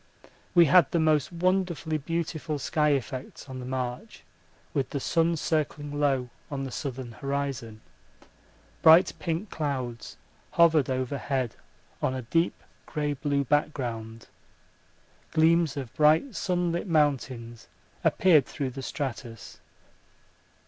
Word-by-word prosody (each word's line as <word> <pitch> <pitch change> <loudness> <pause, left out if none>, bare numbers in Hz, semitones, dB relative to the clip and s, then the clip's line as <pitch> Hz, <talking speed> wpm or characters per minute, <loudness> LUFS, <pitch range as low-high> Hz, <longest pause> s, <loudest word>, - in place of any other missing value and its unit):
We 170 -1 +8
had 180 +4 +6
the 170 - +1
most 155 -1 +2
wonderfully 175 -3 0
beautiful 160 0 -3
sky 150 +1 +1
effects 135 0 -5
on 130 -1 -7
the 125 - -7
march 130 - -4 0.5
with 135 -3 -1
the 140 - -3
sun 165 +4 +1
circling 145 -2 -2
low 135 -4 +1 0.2
on 140 -2 -3
the 135 - -5
southern 130 -4 -5
horizon. 135 -3 -4 1.0
Bright 165 +3 +7
pink 170 +4 -3
clouds 130 -6 -4 0.4
hovered 165 -5 +4
overhead 130 -1 -2 0.5
on 130 - 0
a 130 - -4
deep 165 +9 0 0.2
grey 150 -2 -1
blue 140 0 0
background. 120 -6 -2 1.1
Gleams 160 -2 +3
of 130 -5 -5
bright 155 - +3
sunlit 175 -1 -1
mountains 130 - 0 0.4
appeared 160 -7 +4
through 135 -3 -3
the 135 - -7
stratus. 125 -5 -6
145 Hz, 115 wpm, -27 LUFS, 130-160 Hz, 1.1 s, We